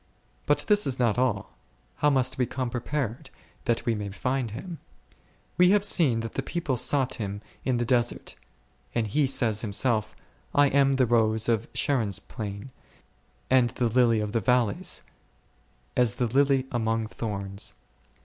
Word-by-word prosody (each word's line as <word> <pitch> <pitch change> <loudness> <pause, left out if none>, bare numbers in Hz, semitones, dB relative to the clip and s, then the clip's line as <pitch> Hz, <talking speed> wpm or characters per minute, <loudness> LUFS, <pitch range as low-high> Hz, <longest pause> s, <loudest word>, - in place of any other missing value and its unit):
But - - +3
this 210 -4 +5
is 130 -2 0
not 120 -2 +1
all; 115 -6 -1 0.4
How 150 - +3
must 130 -2 +1
we 125 - +2
come 130 -2 -3
prepared, 130 +1 -3 0.4
that 120 -2 0
we 115 - +2
may 105 -2 -4
find 125 +4 -2
Him? 165 - -7 0.8
We 180 0 +7
have 205 0 +4
seen 145 - +3
that 115 -1 -5
the - - -1
people 165 -7 -2
sought 130 +2 +1
Him 100 0 -5 0.2
in 130 -2 0
the 120 - 0
desert; 120 0 0 0.6
and 115 -2 +1
He 140 +7 +1
says 115 -5 +1
Himself, 110 0 0 0.3
/ - - -22
am 140 -1 +4
the 130 -1 +3
rose 110 -1 +2
of 115 -1 +1
Sharon 130 -7 +1
s 95 - -2
plain, 100 +4 -7 0.8
and 125 -2 +4
the 120 0 -1
lily 115 -2 +3
of 105 -1 -3
the 115 - +1
valleys; 115 -1 +1 0.9
as 120 -4 +2
the 125 - 0
lily 135 +2 +2
among 115 -2 0
thorns. 100 -3 -5
120 Hz, 160 wpm, -26 LUFS, 110-135 Hz, 0.9 s, We